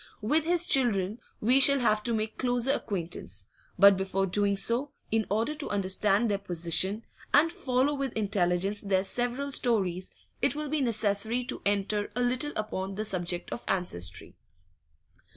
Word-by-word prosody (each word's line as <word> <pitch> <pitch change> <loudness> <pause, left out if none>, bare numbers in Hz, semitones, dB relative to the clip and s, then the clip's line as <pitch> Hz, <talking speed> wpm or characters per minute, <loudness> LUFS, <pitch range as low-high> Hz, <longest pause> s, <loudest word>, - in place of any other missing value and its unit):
With 300 +9 +1
his 345 0 +2
children 220 - +1 0.2
we 250 +5 +4
shall 280 +1 +6
have 215 -4 +2
to 235 - 0
make 220 0 -3
closer 245 +1 +1
acquaintance; 180 -10 -4 0.3
but 200 -1 +7
before 190 0 -1
doing 200 +1 +1
so, 240 +8 0 0.2
in 220 -1 +1
order 225 +8 0
to 300 -1 -6
understand 200 +2 +1
their 200 -2 -1
position 185 +3 +1 0.3
and 315 +3 +5
follow 280 -6 0
with 275 -2 -3
intelligence 195 -1 0
their 190 -2 +1
several 245 +6 -1
stories, 190 -9 0 0.3
it 285 - +1
will 300 -1 -4
be 305 0 -1
necessary 220 0 0
to 245 - -4
enter 205 +1 -1
a 245 - -1
little 255 +4 0
upon 195 -2 -4
the 215 +2 -3
subject 175 -3 -2
of 240 - -5
ancestry. 175 - -1
215 Hz, 155 wpm, -28 LUFS, 195-250 Hz, 0.3 s, but